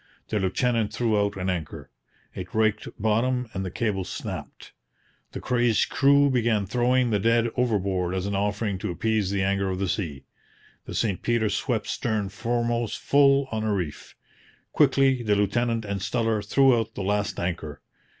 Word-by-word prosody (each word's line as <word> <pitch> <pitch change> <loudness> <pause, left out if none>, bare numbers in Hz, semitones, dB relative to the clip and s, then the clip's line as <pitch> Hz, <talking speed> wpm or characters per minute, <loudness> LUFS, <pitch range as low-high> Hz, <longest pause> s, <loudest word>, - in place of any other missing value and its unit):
The 105 - 0
lieutenant 110 +3 0
threw 110 0 0
out 100 -1 -1
an 90 0 -3
anchor. 85 -5 -4 0.4
It 90 +2 -8
raked 110 -1 +1
bottom 120 +4 +1
and 95 - -3
the 95 - -3
cable 100 0 -1
snapped. 90 - -7 0.6
The - - -5
crazed 120 -3 +1
crew 140 0 +4
began 115 -5 +1
throwing 125 +3 +1
the 105 - +2
dead 115 +2 +2
overboard 95 -7 0
as 95 0 -2
an 100 - -2
offering 100 0 -1
to - - -3
appease 110 +2 0
the 100 -1 0
anger 100 0 0
of 95 - -2
the 95 +1 -1
sea. 80 -8 -3 0.6
The - - -7
St 105 -5 0
Peter 115 -2 +1
swept - - -1
stern 110 -4 -2
foremost 120 +2 -1
full 140 -1 +3
on 110 -1 -2
a 110 - 0
reef. 90 -7 -4 0.6
Quickly 135 -3 +3
the 105 -3 +1
lieutenant 115 +3 0
and 100 -1 -3
Steller 115 0 0
threw 130 +3 +4
out 110 0 -5
the 100 - -4
last 105 +1 -1
anchor. 85 -4 -4
110 Hz, 170 wpm, -25 LUFS, 100-120 Hz, 0.6 s, crew